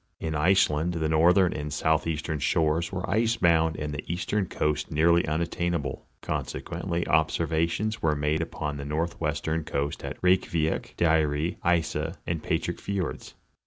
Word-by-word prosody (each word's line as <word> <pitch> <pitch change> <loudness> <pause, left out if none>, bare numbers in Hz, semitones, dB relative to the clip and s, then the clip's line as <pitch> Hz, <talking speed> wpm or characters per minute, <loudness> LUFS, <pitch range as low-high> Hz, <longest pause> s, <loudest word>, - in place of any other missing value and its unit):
In 80 -1 -3
Ice 95 +6 +4
land 80 +4 -1
the 80 -1 0
northern 85 +3 +4
and 75 0 -4
southeastern 80 0 0
shores 80 +3 +1
were 90 +1 -3
ice 115 +3 +1
bound 80 -4 +3
and 75 0 -4
the 70 - -4
eastern 95 +3 -1
coast 75 -2 -1
nearly 85 +3 +3
unattainable; 85 -1 -2
consequently 85 0 -3
observations 85 +6 +1
were 75 -2 +2
made 75 +2 0
upon 75 -3 -4
the 70 - -5
northwestern 80 0 -2
coast 70 -1 -3
at - - -5
Reykiavick, 85 -3 +1
Dyre, 80 -1 +2
Isa 80 -1 0
and 85 -2 -2
Patrix - - -2
fiords. 95 -4 -4
80 Hz, 140 wpm, -27 LUFS, 75-85 Hz, -, Ice